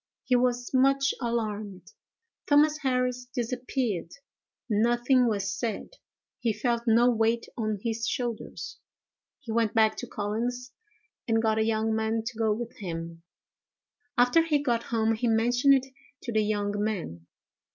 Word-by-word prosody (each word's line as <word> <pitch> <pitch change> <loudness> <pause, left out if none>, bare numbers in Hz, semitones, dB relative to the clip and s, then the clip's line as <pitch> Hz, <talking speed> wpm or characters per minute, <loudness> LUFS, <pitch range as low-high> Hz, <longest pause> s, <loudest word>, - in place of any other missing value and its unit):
He 255 -1 +2
was 245 0 0
much 275 +1 +3
alarmed. 210 -5 -3 0.6
Thomas 300 +1 +4
Harris 250 -3 0
disappeared. 245 -6 -2 0.6
Nothing 240 +3 +3
was 200 -3 -1
said. 235 - -4 0.4
He 230 -2 0
felt 235 +2 -1
no 235 +2 +5
weight 225 0 +1
on 215 -2 -1
his 230 -1 -2
shoulders. 240 -3 -4 0.6
He 235 - -7
went 230 -1 +1
back 220 -1 +4
to 245 - -5
Collins's, 235 +4 -3 0.6
and 225 -1 +2
got 220 -1 +1
a - - +3
young 220 0 0
man 220 0 0
to 240 +1 -5
go 220 -1 +2
with 235 +2 -4
him. 165 -3 -6 1.0
After 245 +7 +5
he 320 -2 +2
got 240 -4 +1
home 225 -1 +1
he 225 +2 -1
mentioned 245 +5 +4
it 265 -1 0 0.4
to 240 - -4
the 215 - +3
young 205 -1 -1
man. 160 - -4
230 Hz, 140 wpm, -27 LUFS, 215-245 Hz, 1.0 s, no